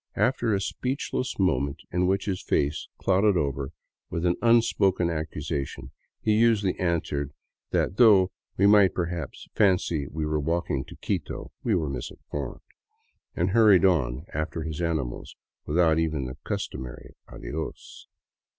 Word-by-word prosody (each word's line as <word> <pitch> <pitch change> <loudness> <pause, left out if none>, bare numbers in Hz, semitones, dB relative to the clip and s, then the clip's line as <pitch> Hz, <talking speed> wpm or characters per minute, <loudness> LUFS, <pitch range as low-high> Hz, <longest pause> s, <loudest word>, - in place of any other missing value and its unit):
After 120 -3 +2
a 100 - +2
speechless 130 +4 -3
moment 70 -8 0
in 90 +1 +1
which 95 +1 +1
his 95 -3 -2
face 75 +2 0
clouded 95 +1 +3
over 70 -3 -1 0.4
with 85 +1 -2
an 85 0 +3
unspoken 110 -7 +3
accusation, 75 -4 -4 0.3
he 110 - +1
usually 110 -4 +3
answered 80 -5 -1 0.4
that 95 - 0
though 100 -6 +6 0.3
we 95 - +4
might 100 -2 +6
perhaps 85 -4 -4
fancy 90 -8 +2
we 80 +2 -3
were 75 0 0
walking 80 -3 -1
to - - -12
Quito, - - -4
we 110 - +2
were 80 -4 0
misinformed, 70 +1 -6 0.7
and 90 +2 +1
hurried 105 -4 +6
on 70 -6 +1
after 80 +2 -3
his 80 0 -4
animals 75 -8 -2 0.3
without 80 0 +3
even 80 -5 -1
the 65 0 -7
customary 65 -2 -5
" - - -51
Adios." 75 +7 -7
85 Hz, 140 wpm, -26 LUFS, 75-95 Hz, 0.7 s, though